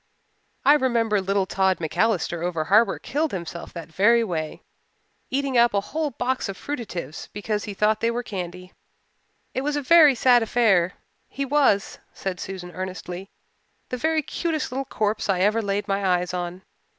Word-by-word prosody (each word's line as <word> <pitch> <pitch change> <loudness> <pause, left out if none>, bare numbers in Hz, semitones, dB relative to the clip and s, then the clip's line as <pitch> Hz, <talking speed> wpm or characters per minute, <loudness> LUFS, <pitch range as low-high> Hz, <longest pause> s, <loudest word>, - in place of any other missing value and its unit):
"I 290 - +8
remember 235 -7 +2
little 195 0 +1
Tod 190 0 +1
MacAllister 170 0 0
over 170 -3 -1
harbour 210 +8 +4
killed 305 +3 -2
himself 170 -2 -6
that 165 -2 -8
very 230 +6 +4
way, 160 -7 -4 0.7
eating 270 -2 +1
up 235 -3 +4
a - - +4
whole 310 -1 0
box 255 -2 -2
of 195 - -5
fruitatives 180 - -6
because 210 0 -2
he 205 - -6
thought 215 +2 +2
they 230 - +1
were 240 +1 -2
candy. 180 -3 -6 0.8
It 260 - -1
was 295 +2 -1
a 290 - 0
very 305 -1 +7
sad 245 0 +5
affair. 210 -6 +3 0.3
He 275 - -4
was," 270 -8 +2
said 185 -2 -4
Susan 185 -2 -6
earnestly, 185 0 -6 0.6
"the 250 - -3
very 315 +4 +1
cutest 320 -2 -2
little 270 +2 -3
corpse 215 -3 -1
I 185 -2 +2
ever 215 +4 +3
laid 200 0 -2
my 200 0 0
eyes 180 -1 +1
on. 180 +1 -4
205 Hz, 165 wpm, -24 LUFS, 180-250 Hz, 0.8 s, I